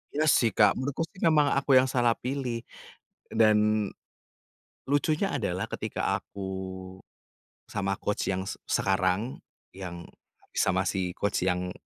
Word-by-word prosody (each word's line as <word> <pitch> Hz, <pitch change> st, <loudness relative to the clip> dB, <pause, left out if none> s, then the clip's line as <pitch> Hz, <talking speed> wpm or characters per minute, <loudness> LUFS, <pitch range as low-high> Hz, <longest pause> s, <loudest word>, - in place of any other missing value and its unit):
Iya 155 Hz, -, +2 dB
sih 115 Hz, -, +3 dB
Kak, 105 Hz, -2 st, +6 dB
menurutku 140 Hz, +4 st, -1 dB
sih 185 Hz, -, -16 dB
emang 150 Hz, -3 st, +4 dB
aku 140 Hz, -1 st, +3 dB
yang 130 Hz, +1 st, +6 dB
salah 120 Hz, -2 st, +3 dB
pilih. 125 Hz, -3 st, -3 dB, 0.7 s
Dan 105 Hz, -1 st, +3 dB, 1.0 s
lucunya 155 Hz, +6 st, +2 dB
adalah 95 Hz, -6 st, -2 dB
ketika -, -, -1 dB
aku 100 Hz, -, -10 dB, 1.3 s
sama 100 Hz, -1 st, -2 dB
coach 105 Hz, -1 st, -1 dB
yang 95 Hz, 0 st, -3 dB
se -, -, -3 dB
sekarang, 95 Hz, +5 st, +1 dB, 0.4 s
yang 85 Hz, -2 st, -7 dB, 0.5 s
sama -, -, +2 dB
si 90 Hz, -2 st, -1 dB
coach 100 Hz, +2 st, -1 dB
yang 90 Hz, 0 st, 0 dB
110 Hz, 125 wpm, -28 LUFS, 95-130 Hz, 1.3 s, Kak